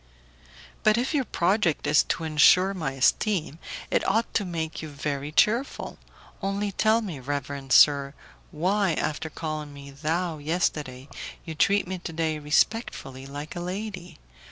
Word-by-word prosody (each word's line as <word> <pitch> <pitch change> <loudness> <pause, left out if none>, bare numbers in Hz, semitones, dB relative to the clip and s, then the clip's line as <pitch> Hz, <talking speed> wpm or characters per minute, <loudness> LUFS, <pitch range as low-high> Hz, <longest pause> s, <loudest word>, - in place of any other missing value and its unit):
"But 215 +1 +4
if 250 +5 0
your 280 -4 +1
project 180 -4 +1
is 150 - +5
to 165 - -2
insure 160 +5 +5
my 160 -8 -3
esteem 160 - +1 0.3
it - - +2
ought 225 +4 0
to 205 - +1
make 160 -3 -4
you 155 - -6
very 145 0 -4
cheerful. 215 - +1 0.4
Only 200 +1 -1
tell 220 +4 +3
me, 180 -10 -5
reverend 140 0 -4
sir, 140 -1 +5 0.3
why, 185 +3 +1
after 155 +2 -2
calling 155 -2 -5
me 140 0 -10
'thou' 160 +3 -2
yesterday, 145 -4 -2 0.4
you 160 - -5
treat 200 +5 +2
me 185 0 -4
today 160 -2 -2
respectfully, 150 - 0
like 145 +4 -7
a - - -4
lady? 185 +1 -5
160 Hz, 145 wpm, -26 LUFS, 145-195 Hz, 0.4 s, is